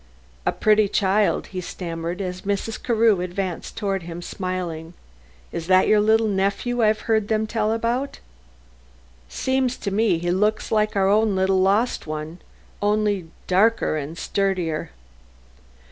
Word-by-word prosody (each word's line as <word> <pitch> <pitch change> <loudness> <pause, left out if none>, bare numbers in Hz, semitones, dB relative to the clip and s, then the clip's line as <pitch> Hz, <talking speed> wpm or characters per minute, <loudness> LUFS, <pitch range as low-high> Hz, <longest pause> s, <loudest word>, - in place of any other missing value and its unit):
"A - - +4
pretty 215 -1 +3
child," 200 +1 +1
he 185 - -3
stammered, 170 0 -5
as 180 -1 -4
Mrs. 205 +3 -3
Carew 225 -5 +3
advanced 180 -1 -4
toward 195 -3 -1
him 170 +1 -7
smiling. 175 -3 -4 0.6
"Is 165 - -5
that 185 0 +5
your 215 - +5
little 220 +1 +3
nephew 200 +5 0
I've 215 -1 +3
heard 220 -2 +1
them 220 0 +1
tell 215 0 0
about? 235 +5 -1 1.1
Seems 260 - 0
to 200 - -4
me 205 -3 +2
he 175 +1 -1
looks 210 +4 0
like 215 -1 +1
our 195 -1 +3
own 210 0 +3
little 190 0 +2
lost 200 +1 +1
one; 155 +3 -5 0.4
only 205 -3 +1 0.2
darker 210 -1 +2
and 155 +2 -5
sturdier." 185 -6 -1
200 Hz, 140 wpm, -23 LUFS, 180-215 Hz, 1.1 s, that